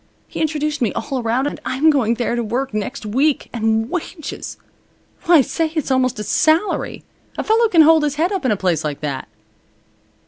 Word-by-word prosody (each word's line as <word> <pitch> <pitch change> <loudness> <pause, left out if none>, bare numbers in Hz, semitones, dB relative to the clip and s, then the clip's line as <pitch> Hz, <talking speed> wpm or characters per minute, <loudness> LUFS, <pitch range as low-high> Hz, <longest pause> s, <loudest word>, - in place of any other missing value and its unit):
He - - -6
introduced 305 -1 -1
me 230 - +1
all 270 - -3
around, 235 +4 0
and 290 - -4
I'm 280 +5 +3
going 235 -6 +1
there 240 0 -1
to 240 - -1
work 245 +3 -3
next 215 +4 -4
week. 270 +8 0
And 225 -1 0
wages! 330 +1 -6 0.7
Why 340 -4 +6
say, 320 +4 -2
it's 305 -4 -1
almost 255 -1 +1
a 210 - -4
salary. 320 - +1 0.3
A - - -1
fellow 450 +1 +3
can 335 -7 +6
hold 320 +1 +6
his 295 -1 -1
head 335 +5 0
up 385 -5 -2
in 260 - +1
a 210 - +1
place 175 -5 0
like 150 -2 -4
that." 140 -3 -4
270 Hz, 195 wpm, -19 LUFS, 225-315 Hz, 0.7 s, Why